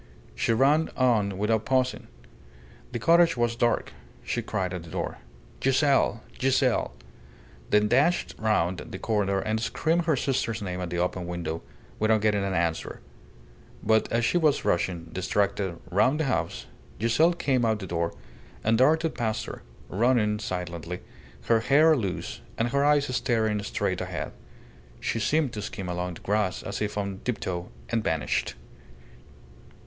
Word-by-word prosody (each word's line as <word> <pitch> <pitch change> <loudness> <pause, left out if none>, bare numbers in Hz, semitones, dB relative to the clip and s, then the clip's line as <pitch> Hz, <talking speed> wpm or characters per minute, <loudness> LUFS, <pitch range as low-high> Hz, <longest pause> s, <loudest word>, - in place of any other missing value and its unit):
She - - 0
ran 140 +7 +3
on 110 -7 +2
without 110 +2 +1
pausing. 130 -1 0 0.8
The 120 - -2
cottage 165 +5 +4
was 120 -1 +1
dark. 120 0 0 0.3
She - - -2
cried 95 -2 -2
at 90 - -4
the 85 - -12
door, - - -4 0.4
"Giselle! 135 -5 +3 0.2
Giselle!" 130 -1 +2 0.8
then 105 0 +4
dashed 145 +10 +2
round 95 -5 +1
the - - -7
corner 100 -2 0
and 110 +2 -1
screamed 165 +8 0
her 160 -3 +3
sister's 125 -4 -1
name 90 -3 -4
at 90 - -3
the 90 - -3
open 90 0 -1
window, 85 -2 -4 0.4
without 110 0 +3
getting 105 -2 +2
an 95 -1 -1
answer; 85 -2 -1 0.8
but 110 0 +2
as 115 0 +2
she 175 - +2
was 150 -3 +2
rushing, 85 -1 0
distracted, 95 -1 0
round 130 - +3
the - - +2
house, 135 -4 -1 0.3
Giselle 120 - +3
came 135 -7 +1
out 110 -1 +3
of 105 - -5
the - - -4
door, 85 -1 -1 0.5
and 110 +1 +3
darted 160 +4 +3
past 110 -2 -2
her, - - -8 0.3
running 105 -1 +2
silently, 90 -3 -4 0.4
her 115 -1 +3
hair 150 +7 +5
loose, 100 -9 -3 0.2
and 115 +1 +1
her 140 +3 +1
eyes 145 -3 +3
staring 110 -5 +1
straight 100 - -2
ahead. - - -4 0.7
She 115 - -1
seemed 145 +3 +1
to 105 - -4
skim 100 -2 -5
along 90 0 -3
the - - -12
grass 105 -2 0
as 100 +1 -5
if 105 -1 -2
on 100 -2 -3
tiptoe, 90 -7 -3 0.2
and 115 -2 0
vanished. 80 -4 -1
110 Hz, 155 wpm, -27 LUFS, 95-130 Hz, 0.8 s, hair